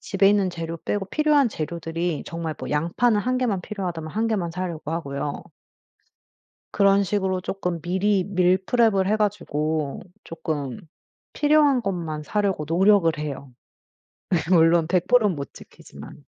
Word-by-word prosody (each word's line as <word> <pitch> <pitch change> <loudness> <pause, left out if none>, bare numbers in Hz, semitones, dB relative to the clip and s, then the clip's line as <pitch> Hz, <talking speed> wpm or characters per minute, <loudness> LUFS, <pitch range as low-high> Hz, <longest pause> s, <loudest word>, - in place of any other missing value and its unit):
집에 195 0 +2
있는 200 -2 +2
재료 165 -1 -5
빼고 195 +3 -3
필요한 300 -2 +3
재료들이 165 -1 -3
정말 165 -2 -4
뭐 - - -6
양파는 180 +9 +1
1 255 +4 0
개만 220 -8 0
필요하다면 175 -5 -5
1 225 +2 -1
개만 195 -7 -1
사려고 170 -3 -5
하고요. 140 -3 -4 1.3
그런 200 0 +4
식으로 190 -2 -1
쪼끔 180 -3 -3
미리 190 +3 +1
밀프랩을 190 +2 +2
해 215 - +2
가지고 155 -8 -1 0.2
쪼끔 145 -6 -4 0.5
필요한 295 -3 +3
것만 165 -7 -3
사려고 195 -1 -1
노력을 185 0 +4
해요. 140 -3 -6 1.0
물론 165 -2 +5
100% 210 +6 +3
못 145 -7 -5
지키지만. - - -13
185 Hz, 275 characters per minute, -24 LUFS, 165-205 Hz, 1.3 s, 물론